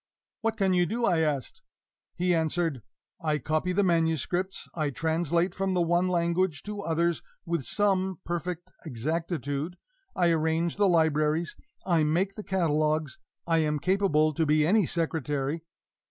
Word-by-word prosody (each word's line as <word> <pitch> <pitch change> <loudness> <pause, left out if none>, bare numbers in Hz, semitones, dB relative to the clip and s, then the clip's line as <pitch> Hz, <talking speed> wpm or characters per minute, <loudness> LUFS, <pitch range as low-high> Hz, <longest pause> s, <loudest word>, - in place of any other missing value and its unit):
"What 225 0 -1
can 195 -3 +2
you 175 -1 +3
do?" 235 +5 -1
I 175 -6 +3
asked. 155 +1 -1 0.5
He 180 0 +1
answered: 160 -4 0 0.4
"I 155 -2 +1
copy 155 +6 -1
the 200 +3 +2
manuscripts, 175 +2 0
I 155 -3 -1
translate 165 +4 0
from 190 -1 -1
the 180 - +2
one 175 +2 +2
language 170 -3 0
to 205 -1 -5
others 170 -1 0 0.2
with 170 -2 -1
some 190 - +1
perfect 175 0 -4
exactitude, 155 +3 -3 0.4
I 175 -2 +3
arrange 160 +2 0
the 205 -1 +4
libraries, 160 0 +2 0.3
I 170 -4 +3
make 175 +6 +1
the 210 - -8
catalogues, 155 -6 0 0.3
I 165 -1 +2
am 150 -1 +1
capable 155 -2 +2
to 160 - 0
be 150 0 +3
any 200 +1 +3
secretary." 155 -2 -1
170 Hz, 145 wpm, -28 LUFS, 155-180 Hz, 0.5 s, the